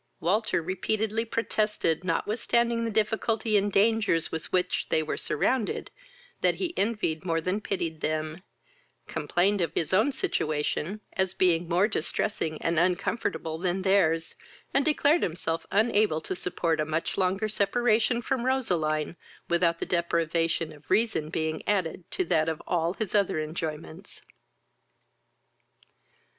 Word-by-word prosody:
Walter 195 0 +1
repeatedly 215 +5 -1
protested, 210 -7 0
notwithstanding 230 +5 0
the - - -1
difficulty 220 +1 0
and 205 0 +2
dangers 205 -5 +2
with 160 - -5
which 180 0 0
they 160 - +2
were 155 - -2
surrounded, 225 - -1 0.5
that - - +3
he 350 -2 -3
envied 200 -7 -1
more 165 -3 0
than 185 +4 -1
he - - -6
pitied 165 -6 -3
them, 155 +2 -2 0.6
complained 195 +3 0
of 165 - -1
his 165 - 0
own 215 +9 +4
situation, 155 - -2
as 190 -1 0
being 175 -2 +2
more 180 +4 +3
distressing 160 -4 -2
and 165 -1 +2
uncomfortable 175 -2 -1
than 185 +1 -1
their's, 165 -5 +2 0.4
and 275 +1 +3
declared 305 +1 +3
himself 165 -1 -2
unable 210 -5 +2
to 185 - -4
support 170 -2 -1
a - - +3
much 155 +1 -2
longer 195 +3 +1
separation 230 +3 +1
from 260 -1 -1
Roseline, 170 - 0 0.3
without 170 -1 +2
the - - -3
deprivation 165 -1 0
of 145 -1 -18
reason 215 -9 +1
being 160 -1 -2
added 185 -4 -1
to 185 - -1
that 165 -2 +2
of 160 - -3
all 170 +1 0
his 215 -4 -3
other 200 -6 +2
enjoyments. 160 +3 -6
185 Hz, 135 wpm, -27 LUFS, 165-215 Hz, 0.6 s, own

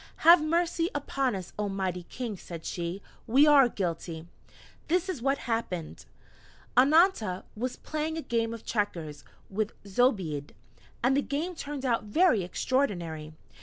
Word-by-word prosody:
"Have 335 0 +9
mercy 335 +1 +1
upon 270 -4 -1
us, 185 -2 -7
oh 205 -1 0
Mighty 190 -2 -2
King," 240 -5 -4
said 170 -3 -9
she: 175 +2 -4 0.2
"we 265 +6 +6
are 280 -4 +7
guilty! 170 -4 -4 0.6
This 360 +3 +1
is 365 -10 -4
what 275 +2 +1
happened: 225 -10 -3 0.7
Annanta 265 - +4
was 245 +3 -3
playing 310 +1 -3
a 320 - -4
game 230 -1 0
of 230 -1 -8
checkers 165 - -2 0.2
with 210 +2 -2
Zobeide, 190 - 0 0.5
and 260 +2 +4
the 280 - +3
game 305 +6 -3
turned 290 -4 -5
out 235 -3 +1
very 240 - +3
extraordinary. 175 - -1
230 Hz, 140 wpm, -29 LUFS, 185-290 Hz, 0.7 s, Have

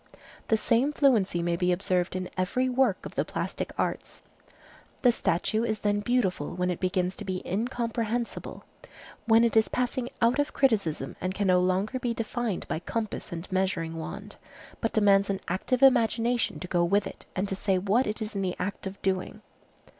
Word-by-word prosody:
The 220 - +3
same 240 +6 +2
fluency 215 - +3
may 170 0 +1
be 180 +1 +1
observed 180 0 0
in 185 0 -2
every 185 +8 0
work 260 +1 +1
of - - -7
the - - +1
plastic - - -4
arts. - - -3 0.8
The 245 - +7
statue 220 +1 0
is 220 -2 0
then 205 0 +1
beautiful 205 -10 0
when 180 0 0
it 175 - -4
begins 185 0 0
to - - -6
be 185 -1 -4
incomprehensible, 230 +2 -2 0.6
when 225 0 +6
it 235 - +2
is 220 0 +5
passing 250 0 -1
out 235 +4 +3
of 290 - 0
criticism 210 - +1
and 185 +1 -2
can 205 - 0
no 180 -1 +4
longer 190 +7 0
be 240 -2 -2
defined 230 -3 -3
by - - -2
compass 220 +5 -4
and 170 +1 -5
measuring 185 -3 0
wand, 160 - -7 0.4
but 225 - -1
demands 200 -2 +4
an 195 -1 -1
active 245 +8 0
imagination 240 -2 +3
to 180 - -5
go 175 -1 +2
with 200 +4 +2
it - - -9
and 190 +2 0
to 195 - -2
say 190 -1 +1
what 205 +7 +2
it 215 +1 -2
is 215 - -6
in 200 - -2
the 185 -2 -1
act 195 +1 -4
of 190 +1 -8
doing. 190 +3 -2
205 Hz, 185 wpm, -28 LUFS, 185-235 Hz, 0.8 s, The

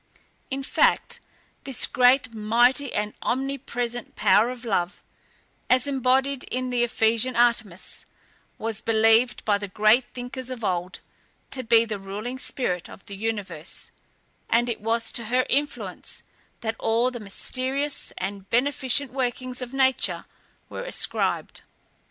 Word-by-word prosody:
In 270 0 -3
fact, - - +2 0.4
this 270 -4 +2
great, 250 -1 +4
mighty, 240 +5 +3
and 210 0 -2
omnipresent 245 -2 -3
power 220 +4 +4
of 250 -1 -7
love, 180 -4 -1 0.7
as 255 0 +4
embodied 265 0 +1
in 255 0 -2
the 245 -1 +1
Ephesian 230 +1 +1
Artemis, 230 -6 0 0.5
was 225 -2 -1
believed 225 +2 +3
by 205 -2 +3
the 205 - -4
great 215 +5 +4
thinkers 250 +1 -6
of 250 -3 -6
old, 180 -1 -2 0.5
to 265 - 0
be 230 -1 +4
the 215 -3 -4
ruling 210 +7 -5
spirit 180 -11 -2
of - - -13
the 200 - -7
universe, 195 -6 -4 0.6
and 240 +1 +3
it 230 - -3
was 225 +1 0
to 235 - -1
her 250 +3 +2
influence, 290 +2 -2 0.4
that 225 -1 -2
all 235 +3 +2
the 245 - -6
mysterious 260 +7 -3
and 195 +1 -5
beneficent 265 +1 +2
workings 255 -1 -2
of 250 -1 -5
nature 265 -1 +1 0.4
were - - -6
ascribed. - - -1
240 Hz, 135 wpm, -25 LUFS, 215-255 Hz, 0.7 s, great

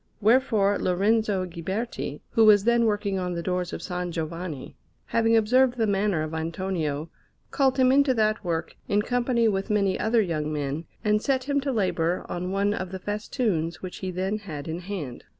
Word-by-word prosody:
Wherefore 215 -3 +3
Lorenzo 200 +1 +1
Ghiberti, 180 -1 -4
who 225 - +4
was 210 -2 +7
then 235 +1 +3
working 205 -3 0
on 180 -1 -2
the 170 - -3
doors 180 -1 -1
of - - -5
S. 180 -1 -3
Giovanni, 165 -3 -5 0.3
having 230 0 +3
observed 250 +3 +3
the 225 - +2
manner 200 -5 +1
of 155 0 -5
Antonio, 160 -2 -3 0.4
called 265 -1 +2
him 255 -1 +5
into 275 -1 +4
that 215 -1 +1
work 165 -2 -3
in 205 +1 +2
company 245 -1 +1
with 195 0 -1
many 200 -3 +1
other 225 0 +3
young 155 -4 -2
men, 150 +2 -3 0.2
and 210 0 +2
set 265 0 0
him 280 +1 0
to 275 0 -1
labour 180 -6 0
on 180 +1 -4
one 200 +2 +1
of 185 -2 -4
the 190 - -4
festoons 205 - -2
which 185 - -6
he 190 - -4
then 190 +4 -2
had 155 -8 -7
in 160 +2 -3
hand. 175 -9 -6
195 Hz, 185 wpm, -26 LUFS, 170-225 Hz, 0.4 s, was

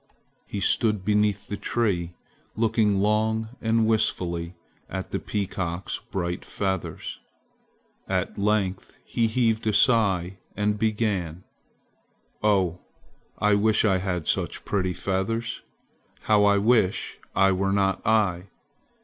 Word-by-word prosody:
He 100 - -4
stood 105 -1 +2
beneath 105 -1 +1
the 100 - -4
tree 90 -8 -1 0.4
looking 110 -3 +2
long 110 +1 +1
and 115 0 +2
wistfully 90 -6 0 0.3
at - - -5
the - - -1
peacock's 95 -3 -3
bright 90 -2 -4
feathers. 95 -3 -4 0.9
At - - -1
length 100 -2 -1
he 115 -1 0
heaved 110 -1 +1
a 110 - +2
sigh 95 -6 +3 0.2
and 105 0 0
began: 100 -6 -1 1.0
"Oh, 95 -5 +2 0.6
I 105 0 +3
wish 110 +2 +3
I 95 -3 +3
had 90 -4 -2
such - - -1
pretty 95 -3 -1
feathers! 115 +5 -2 0.6
How 105 -1 +3
I 100 0 +4
wish 105 -2 +1 0.2
I 95 0 +4
were 95 +1 0
not 100 -1 +1
I! 100 -5 +2
100 Hz, 115 wpm, -25 LUFS, 95-110 Hz, 1.0 s, I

